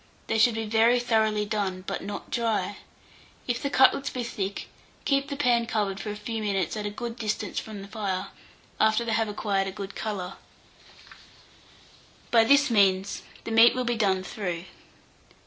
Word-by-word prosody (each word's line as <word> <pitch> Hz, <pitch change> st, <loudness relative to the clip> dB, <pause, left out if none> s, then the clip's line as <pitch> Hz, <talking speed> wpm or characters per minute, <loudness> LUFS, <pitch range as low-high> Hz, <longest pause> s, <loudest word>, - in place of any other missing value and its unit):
They 225 Hz, -, 0 dB
should 230 Hz, 0 st, +5 dB
be 225 Hz, 0 st, -2 dB
very 225 Hz, +3 st, +4 dB
thoroughly 220 Hz, -3 st, +1 dB
done, 200 Hz, -3 st, -2 dB
but -, -, -3 dB
not 205 Hz, +1 st, -7 dB
dry. 220 Hz, -4 st, -1 dB, 0.7 s
If 240 Hz, -1 st, -1 dB
the 280 Hz, -, -1 dB
cutlets 275 Hz, +1 st, +4 dB
be 250 Hz, -, -4 dB
thick, 200 Hz, -4 st, -4 dB, 0.4 s
keep 275 Hz, 0 st, +2 dB
the 280 Hz, -, -4 dB
pan 240 Hz, -4 st, +2 dB
covered 205 Hz, -3 st, -1 dB
for 215 Hz, -, -5 dB
a 210 Hz, -, -4 dB
few 220 Hz, +2 st, -4 dB
minutes 200 Hz, -2 st, -1 dB
at 210 Hz, -1 st, -3 dB
a -, -, -2 dB
good 230 Hz, +3 st, -6 dB
distance 215 Hz, -2 st, -2 dB
from 210 Hz, -3 st, -8 dB
the -, -, -10 dB
fire, 200 Hz, -3 st, -3 dB, 0.5 s
after 220 Hz, +2 st, +3 dB
they 230 Hz, -, -1 dB
have 225 Hz, 0 st, +1 dB
acquired 200 Hz, -2 st, -1 dB
a -, -, -3 dB
good 195 Hz, 0 st, -7 dB
colour: 195 Hz, -4 st, -4 dB, 1.9 s
by 230 Hz, -1 st, +6 dB
this 280 Hz, +3 st, +4 dB
means, 195 Hz, -2 st, +3 dB, 0.2 s
the 230 Hz, -, -5 dB
meat 225 Hz, +2 st, +7 dB
will 255 Hz, 0 st, -1 dB
be 240 Hz, 0 st, 0 dB
done 195 Hz, -4 st, +1 dB
through. 180 Hz, -4 st, -4 dB
215 Hz, 175 wpm, -27 LUFS, 200-235 Hz, 1.9 s, meat